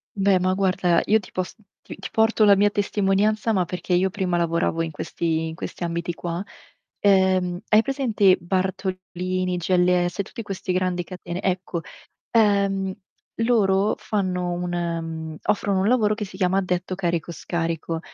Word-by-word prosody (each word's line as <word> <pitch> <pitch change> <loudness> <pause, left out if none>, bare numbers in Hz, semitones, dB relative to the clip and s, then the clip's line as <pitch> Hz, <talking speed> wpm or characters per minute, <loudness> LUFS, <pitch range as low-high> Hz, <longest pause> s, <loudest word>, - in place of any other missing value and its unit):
Beh, 195 -2 +3
ma 185 +1 +1
guarda, 185 -2 +2
io 220 +1 +4
ti - - -14
pos 185 0 -4 0.3
ti - - -9
ti - - -7
porto 220 0 +3
la 200 -1 +7
mia 205 +1 +4
testimonianza, 205 +2 +1
ma 185 -2 +2
perché 180 +1 -3
io 185 +2 +3
prima 185 -2 -1
lavoravo 170 -1 0
in 165 -1 -2
questi 160 +1 -2
in 160 - -6
questi 175 - -6
ambiti 170 0 -3
qua. 175 +2 -4 0.6
Ehm, 190 -2 +3
hai 215 +1 +5
presente 225 -8 +3
Bartolini, 185 0 -2
GLS, 180 0 +2
tutti 230 +4 -8
questi 195 -2 -4
grandi 180 -1 0
catene? 180 0 -7
Ecco, 180 -2 -1 0.5
ehm, 200 -3 +2 0.5
loro 205 -4 +3
fanno 185 -4 -2
un 175 0 -3
ehm, 165 -2 -3
offrono 200 -2 +1
un 205 - +2
lavoro 220 -4 +3
che 210 -1 -4
si 190 - -10
chiama 185 0 +2
addetto 185 0 -1
carico-scarico, 170 -2 -2
185 Hz, 150 wpm, -23 LUFS, 175-200 Hz, 0.6 s, la